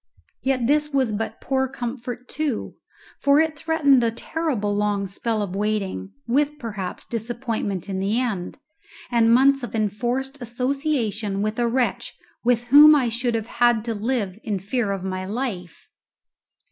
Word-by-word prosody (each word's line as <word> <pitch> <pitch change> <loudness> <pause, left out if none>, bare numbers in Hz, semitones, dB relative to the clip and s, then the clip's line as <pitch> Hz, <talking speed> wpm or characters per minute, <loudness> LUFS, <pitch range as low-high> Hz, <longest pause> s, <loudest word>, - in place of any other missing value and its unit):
Yet 260 -3 0
this 300 +3 +2
was 265 -5 +1
but 220 +1 -3
poor 265 0 0
comfort 245 -1 -6
too; 300 -7 -2 0.5
it 310 +3 +4
threatened 290 -5 +3
a 230 - +3
terrible 230 -5 -2
long 205 -1 0
spell 215 +3 -2
of 190 -2 -5
waiting, 195 - -2 0.2
with 290 +4 +1
perhaps 205 -8 -5
disappointment 230 -4 -3
in 190 -1 -3
the 200 +5 +1
end, 210 -8 -3 0.5
and 230 -1 +4
months 275 +3 +5
of 235 -3 -5
enforced 245 +6 -2
association 240 -5 -1
with 215 +2 -2
a 240 - +2
wretch 245 +1 -1 0.3
with 240 0 +2
whom 300 +1 +10
I 255 -5 +2
should 235 +1 -1
have 235 0 +2
to 230 0 -2
live 215 -3 -2
in 210 -3 -1
fear 205 +3 -1
of 195 -2 -3
my 185 -1 -3
life. 195 - -5
235 Hz, 145 wpm, -23 LUFS, 210-265 Hz, 0.5 s, whom